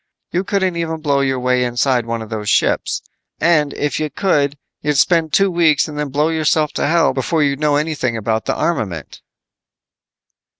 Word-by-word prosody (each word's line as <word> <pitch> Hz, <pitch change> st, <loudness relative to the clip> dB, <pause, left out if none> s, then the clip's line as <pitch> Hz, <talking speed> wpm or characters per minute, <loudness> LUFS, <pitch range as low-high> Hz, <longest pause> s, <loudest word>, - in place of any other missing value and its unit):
You 180 Hz, +2 st, 0 dB
couldn't 190 Hz, -2 st, 0 dB
even 160 Hz, -1 st, -3 dB
blow 145 Hz, -3 st, +1 dB
your 135 Hz, -1 st, 0 dB
way 125 Hz, 0 st, +1 dB
inside 120 Hz, 0 st, 0 dB
one 115 Hz, -1 st, -3 dB
of 110 Hz, -, -12 dB
those 105 Hz, -2 st, -3 dB
ships. -, -, +1 dB, 0.4 s
And 155 Hz, -4 st, +2 dB
if 145 Hz, +1 st, -2 dB
you 155 Hz, -1 st, -2 dB
could, 145 Hz, -6 st, 0 dB, 0.2 s
you'd 150 Hz, -1 st, 0 dB
spend 165 Hz, +1 st, +3 dB
two 195 Hz, +3 st, +3 dB
weeks 165 Hz, -4 st, +3 dB
and 150 Hz, -, -8 dB
then 150 Hz, -1 st, -3 dB
blow 150 Hz, +4 st, +1 dB
yourself 155 Hz, -1 st, +1 dB
to -, -, -1 dB
hell 165 Hz, -3 st, +3 dB
before 150 Hz, +4 st, 0 dB
you'd 140 Hz, -1 st, 0 dB
know 150 Hz, -1 st, +2 dB
anything 145 Hz, -6 st, -1 dB
about 110 Hz, 0 st, -2 dB
the -, -, -1 dB
armament." 100 Hz, -, -3 dB
150 Hz, 180 wpm, -18 LUFS, 125-160 Hz, 0.4 s, spend